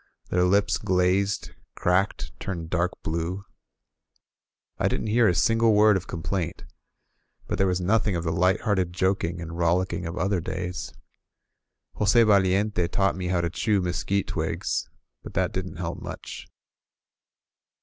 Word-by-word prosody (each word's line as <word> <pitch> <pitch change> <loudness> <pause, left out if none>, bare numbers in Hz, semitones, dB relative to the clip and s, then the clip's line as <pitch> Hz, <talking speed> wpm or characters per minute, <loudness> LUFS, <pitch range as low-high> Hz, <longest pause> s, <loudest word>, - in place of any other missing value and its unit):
Their 90 0 +2
lips 100 +2 +2
glazed, 95 +2 +1 0.2
cracked, 90 +3 0
turned 85 -4 -5
dark 90 0 +1
blue. 85 +5 -3 1.3
I - - +2
didn't 110 - -1
hear 120 -1 +5
a 90 - +2
single 115 +1 +3
word 105 0 +6
of 95 - -3
complaint; 85 +1 -3 0.8
but - - -3
there 95 - +3
was 90 -1 0
nothing 100 +2 +1
of 85 - -2
the 80 - -1
lighthearted 95 +1 +1
joking 95 -2 0
and 85 -1 -6
rollicking 85 +1 0
of 85 - -6
other 95 -2 0
days. 90 +2 -4 1.1
Jos6 115 +3 +4
Valiente 100 -2 +3
taught 95 +2 +1
me 90 -1 -4
how 90 -1 +1
to 85 -1 -2
chew 105 +2 +1
mesquite 90 +2 -1
twigs, - - -2 0.3
but - - -11
that - - +1
didn't - - -4
help - - -5
much. - - -8
90 Hz, 140 wpm, -26 LUFS, 85-100 Hz, 1.3 s, word